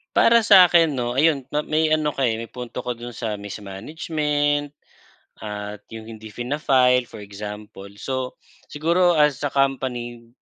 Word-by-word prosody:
Para 235 0 +5
sa 195 -4 +8
akin 165 -2 +4
'no, 120 0 -2
ayun 140 -2 +2
ma 150 - +1
may 155 +1 +1
ano 155 -1 0
ka 135 -2 -1
may 115 0 -3
punto 125 -2 -7
ka 125 -1 -4
dun, 120 0 -8
sa 110 -3 -4
mismanagement 145 - -2 0.7
at 105 -1 -6
yung 110 -1 -9
hindi 110 -1 -10
fina-file 125 +1 +1
for 105 - -10
example. 105 0 -9
So 130 +2 -4 0.3
siguro 170 +3 +2
as 150 -2 +3
a 145 - 0
company 125 -4 -2
125 Hz, 150 wpm, -22 LUFS, 110-150 Hz, 0.7 s, sa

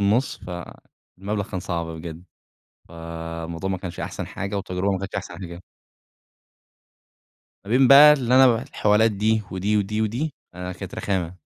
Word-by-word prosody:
النص، 105 +7 +1
فالمبلغ 95 +3 -7
كان 95 -3 -3
صعب 85 -1 -3
بجد. 80 +1 -8 0.7
فالموضوع 85 +1 -6
ما 95 - -1
كانش 90 -2 -7
أحسن - - -5
حاجة 100 +1 -5
والتجربة 95 0 -1
ما 95 - 0
كانتش 100 0 -6
أحسن - - -5
حاجة. 85 -1 -8 2.0
ما 100 - -9
بين 130 +1 +5
بقى 145 +2 +10
اللي 130 -4 +1
أنا 130 0 +8
ابعت 120 -2 +2
الحوالات 105 +2 +3
دي 110 +2 +1
ودي، 100 +3 0
ودي، 105 +1 0
ودي 130 +8 -2 0.2
آآ، 90 +1 -5
كانت 95 +1 -8
رخامة. 90 -3 -2
95 Hz, 150 wpm, -23 LUFS, 90-110 Hz, 2.0 s, بقى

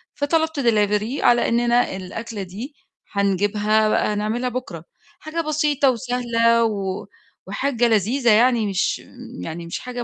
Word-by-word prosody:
فطلبت 320 +1 0
delivery 215 0 +1
على 240 0 +4
إنّنا 240 -2 +2
الأكلة 205 +2 -6
دي 220 - -8 0.4
هنجيبها 205 +2 +1
بقى 210 - +1
نعملها 225 +4 -1
بُكرة، 230 -10 -6 0.4
حاجة 315 +2 -3
بسيطة 300 -3 +1
وسهلة 235 -1 +1
و 200 -4 -2 0.4
وحاجة 245 -4 0
لذيذة 230 +3 +2
يعني 230 0 +4
مش 195 -2 0 0.4
يعني 165 - -6
مش 170 - -5
حاجة 245 -1 -6
230 Hz, 125 wpm, -22 LUFS, 205-250 Hz, 0.4 s, على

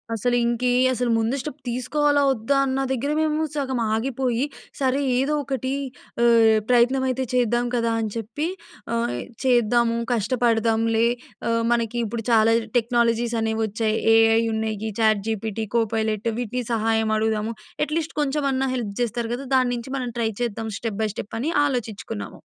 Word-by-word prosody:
అసలు, 245 +3 0
ఇంకే 240 +1 +1 0.2
అసలు 245 -1 -1
ముందు 225 +4 0
స్టెప్ 295 +1 -6
తీసుకోవాలా 285 +4 +1
వద్దా 265 +3 0
అన్న 265 0 -1
దగ్గర 265 +3 -1
మేము 310 0 +1
సగం 265 -3 -1
ఆగిపోయి, 250 +2 0 0.3
సరే 270 0 +1 0.2
ఏదో 275 +3 +1
ఒకటి 265 -1 -3 0.5
ఆహ్, 230 -2 +6
ప్రయత్నమైతే 255 +1 +3
చేద్దాం 240 -1 +2
కదా! 230 -1 +1
అని 220 - -2
చెప్పి! 245 +8 -3 0.5
ఆహ్, 230 - 0 0.3
చేద్దాము. 235 -2 +3 0.2
కష్టపడదాంలే! 225 -1 +2 0.4
ఆహ్, 230 0 +2
మనకిప్పుడు 235 -1 -1
చాలా 225 0 +5 0.2
టెక్నాలజీస్ 235 0 +1
అనేవొచ్చాయి. 220 0 0 0.2
ఏఐ 225 0 +5
ఉన్నాయి. 220 0 -2
చాట్‌జీపీటి 220 0 0
కోపైలెట్ 220 -1 0
వీటిని 245 +1 -2
సహాయం 220 0 +1
అడుగుదాము. 220 0 0 0.3
అట్‌లీస్ట్ 315 +2 -3
కొంచెమన్నా 275 -2 0
హెల్ప్ 220 -5 -3
జేస్తారు 235 0 -2
కదా! 270 +3 -7
దానుంచి 245 -1 0
మనం 250 -2 -3
ట్రై 225 - +1
చేద్దాం 225 -1 -2
స్టెప్ 220 -3 -4
బై 215 - +1
స్టెప్ 215 - -6
అని 290 - -1 0.2
ఆలోచించుకున్నాము. 220 - -4
235 Hz, 135 wpm, -23 LUFS, 220-255 Hz, 0.5 s, ఆహ్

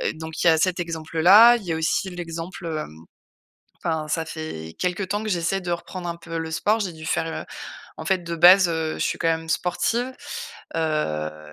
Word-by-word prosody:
donc 160 +1 -5
il - - +4
y - - +9
a 160 - +5
cet 180 +2 +1
exemple-là, 170 +8 +6
il 215 - -10
y 170 - -3
a - - -1
aussi 180 +4 0
l'exemple, 170 0 -6
hem, 155 - -4 0.9
enfin, 160 -2 -1
ça 160 +1 -1
fait 80 - -7
quelque 180 +2 -1
temps 205 +3 -2
que 215 - -2
j'essaie 180 +2 0
de 175 -1 -2
reprendre 175 +1 -5
un 170 - -5
peu 165 0 -7
le 160 0 -4
sport. 215 +6 +1
J'ai 185 -4 -2
dû 160 0 -10
faire, 165 - 0 0.2
heu, - - -13 0.5
en - - -6
fait 190 -2 +2
de 170 0 -4
base, 180 +2 +8
heu, 160 -1 -1
je - - -8
suis - - -1
quand 165 - +1
même 160 0 -1
sportive. 235 +10 0 0.6
Heu, 75 - -2
165 Hz, 210 wpm, -24 LUFS, 160-180 Hz, 0.9 s, y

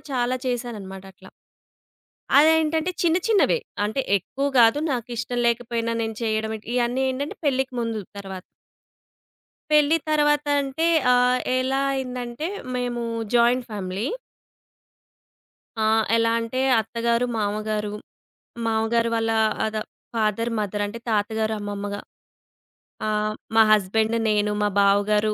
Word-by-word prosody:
చాలా 250 0 0
చేశాననమాట 215 -6 -4
అట్లా. 190 0 -16 1.1
అదేంటంటే 320 +2 +3
చిన్న 335 -1 +3
చిన్నవే, 445 +2 +3 0.3
అంటే 220 +6 -1 0.2
ఎక్కువ 275 +9 -4
కాదు. 230 +5 +5
నాకిష్టం 240 0 -3
లేకపోయినా 230 -1 -1
నేను 225 -1 -4
చేయడం. 220 -1 -1 0.2
ఇయన్నీ 245 +2 +1
ఏంటంటే 280 +3 -4
పెళ్లికి 265 -1 0
ముందు, 230 -2 -2 0.2
తర్వాత 190 -2 -7 1.3
పెళ్లి 300 +1 +5
తర్వాత 295 -1 +2
అంటే 280 +4 -1 0.3
ఆహ్, 250 0 +3 0.2
ఎలా 265 +1 0
అయిందంటే 250 +3 -4 0.3
మేము 245 -1 -2 0.3
జాయింట్ 240 +1 +3
ఫ్యామిలీ. 200 +4 -3 1.7
ఆ! 220 - +1 0.3
ఎలా 230 0 +2
అంటే 230 +3 -3 0.2
అత్త 225 +2 -10
గారు, 235 +1 +2
మావ 205 -1 0 0.2
గారు, 210 -1 -1 0.8
మావ 220 -1 +1
గారి 230 0 +2
వాళ్ల 225 0 0 0.3
ఆద 220 0 -2 0.4
ఫాదర్, 225 +1 0
మదర్ 205 0 -2
అంటే 210 +3 -7
తాత 205 -1 +1
గారు, 220 0 0
అమ్మమ్మగా 205 0 -4 1.1
ఆహ్, 215 0 0 0.2
మా 225 - +8
హస్బాండు 220 +3 +2
నేను, 210 0 +1
మా 205 - +2
బావగారు, 210 +2 +3
230 Hz, 120 wpm, -24 LUFS, 210-255 Hz, 1.7 s, మా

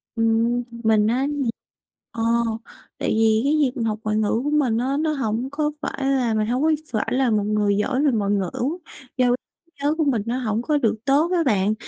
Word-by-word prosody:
Ừm. 230 +2 +1 0.2
Mình 215 -1 +3
á 260 +4 +1
nh 285 -5 -1 0.6
ờ, 230 - -5 0.8
tại - - -2
vì 220 0 +3
cái 285 +2 +2
việc 260 -3 +2
mình 230 -3 -2
học 215 -1 -2
ngoại 215 0 0
ngữ 220 +2 +1
của 295 - -1
mình 270 -7 +2
á 265 +4 0
nó 310 -1 0
hổng 240 -1 -2
có 300 +1 -1
phải 270 - -3
là 255 -4 +1
mình 215 0 0
hông 250 +5 0
có 320 - +3 0.2
phải 220 -1 -1
là 260 -1 +2
một 210 -2 +1
người 210 -1 +1
giỏi 260 +6 0
về 280 - +4
ngoại 205 -3 0
ngữ. 195 -4 0 0.7
Do 250 -1 +3
trí 295 +7 -5
nhớ 295 +2 +2
của 315 - +2
mình 250 -7 +1
nó 240 +2 -1
hổng 225 -2 -1
có 295 +4 +1
được 225 -5 +1
tốt 295 +6 +3
á 345 -2 +2
bạn, 210 -4 +2
240 Hz, 220 wpm, -22 LUFS, 215-275 Hz, 0.8 s, về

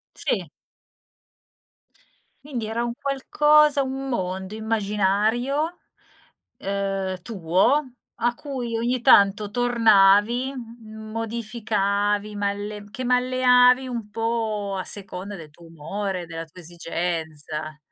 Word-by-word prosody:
Sì. - - -2 2.0
Quindi 250 -6 -4
era 225 +2 -2
un 240 - -2
qualcosa 295 +1 +3
un 270 +1 -4
mondo 190 -4 -3
immaginario, 220 - 0 0.8
ehm, 195 -2 -3
tuo 190 - +2 0.3
a 240 +1 0
cui 245 -4 -4
ogni 240 +2 0
tanto 205 -4 +5
tornavi, 230 +1 +4
m 220 -2 -10
modificavi, 210 -2 -1
malle 205 +1 -3
che 255 - -5
malleavi 250 0 +4
un 235 -4 -5
po' 220 -3 -2
a 185 - -2
seconda 200 0 -7
del 160 -4 -11
tuo 170 +3 -17
umore, 180 +3 -4
della 165 0 -6
tua 165 +3 -15
esigenza. 160 -3 -4
215 Hz, 100 wpm, -24 LUFS, 195-245 Hz, 2.0 s, tanto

